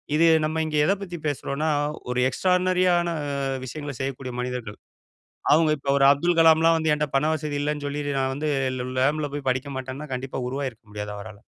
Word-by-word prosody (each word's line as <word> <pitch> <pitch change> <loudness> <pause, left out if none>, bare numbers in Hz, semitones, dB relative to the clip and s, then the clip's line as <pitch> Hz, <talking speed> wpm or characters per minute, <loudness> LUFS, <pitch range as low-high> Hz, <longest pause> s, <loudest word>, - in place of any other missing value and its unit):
இது 165 +2 +5 0.2
நம்ம 155 +1 0
இங்க 155 -1 -3
எத - - +3
பத்தி 175 -3 -6
பேசுறோனா, 145 +1 -2 0.4
ஒரு 125 0 0
எக்ஸ்ட்ரார்னரி 180 +5 +2
ஆன 175 0 0 0.6
விஷயங்கள 145 +2 -6
செய்யக்கூடிய 135 -1 -4
மனிதர்கள். 125 -4 -4 0.8
அவங்க 155 0 +5
இப்போ 140 0 -2
ஒரு 135 - +4
'அப்துல் 170 +5 +2
கலாம்லா' 165 0 +6
வந்து 160 -1 +1
என்ட்ட 150 0 -1
பண 150 +3 +2
வசதி 150 -1 -3
இல்லனு 150 0 -2
சொல்லிடு 145 0 -3
நா 135 - +1
வந்து 150 +2 -2 0.3
ல 125 - -3
லாம்ப்ல 145 +2 +1
போய் 140 -2 -3
படிக்க 130 +3 -2
மாட்டேனா, 130 +3 -6
கண்டிப்பா 130 +1 -4
உருவாயிருக்க 130 -4 -4
முடியாது 105 0 -5
அவரால. 105 0 -10
145 Hz, 175 wpm, -24 LUFS, 130-155 Hz, 0.8 s, கலாம்லா